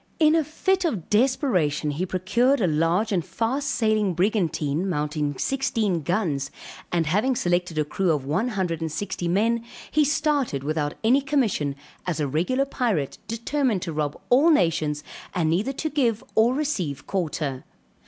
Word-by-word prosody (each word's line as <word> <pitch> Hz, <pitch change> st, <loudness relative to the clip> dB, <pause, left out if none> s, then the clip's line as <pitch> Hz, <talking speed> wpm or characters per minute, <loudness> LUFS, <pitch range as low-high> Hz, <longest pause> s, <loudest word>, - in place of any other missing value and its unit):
In 310 Hz, -1 st, +5 dB
a 325 Hz, -1 st, +3 dB
fit 375 Hz, +5 st, 0 dB
of 225 Hz, -, -2 dB
desperation 210 Hz, -, +2 dB
he 170 Hz, +6 st, -2 dB
procured 230 Hz, +10 st, +2 dB
a 205 Hz, -, +2 dB
large 170 Hz, +7 st, +1 dB
and 180 Hz, -4 st, +1 dB
fast 265 Hz, -, -2 dB
sailing 215 Hz, -5 st, +1 dB
brigantine 175 Hz, -3 st, 0 dB
mounting 150 Hz, -3 st, -1 dB
sixteen 230 Hz, -10 st, 0 dB
guns 155 Hz, -5 st, -1 dB, 0.4 s
and 170 Hz, -2 st, +1 dB
having 210 Hz, -, +1 dB
selected 175 Hz, -5 st, 0 dB
a 155 Hz, -, +2 dB
crew 185 Hz, +5 st, -1 dB
of 145 Hz, -4 st, -1 dB
one 165 Hz, -, 0 dB
hundred 185 Hz, -8 st, -2 dB
and 160 Hz, -1 st, -2 dB
sixty 175 Hz, +1 st, -3 dB
men 225 Hz, +6 st, +1 dB, 0.3 s
he 305 Hz, -, +4 dB
started 285 Hz, -, 0 dB
without 150 Hz, 0 st, -1 dB
any 250 Hz, +5 st, +4 dB
commission 235 Hz, -, 0 dB, 0.3 s
as 170 Hz, -3 st, -1 dB
a 150 Hz, -, 0 dB
regular 180 Hz, -, +1 dB
pirate 220 Hz, -, -1 dB
determined 235 Hz, -2 st, -1 dB
to 170 Hz, -4 st, -4 dB
rob 150 Hz, -1 st, -2 dB
all 280 Hz, +7 st, +6 dB
nations 160 Hz, -, +2 dB, 0.3 s
and 160 Hz, -3 st, +1 dB
neither 205 Hz, +11 st, 0 dB
to 310 Hz, -, -3 dB
give 255 Hz, -6 st, 0 dB
or 235 Hz, +3 st, +4 dB
receive 200 Hz, -, -2 dB
quarter. 150 Hz, -7 st, -2 dB
190 Hz, 160 wpm, -24 LUFS, 155-255 Hz, 0.4 s, all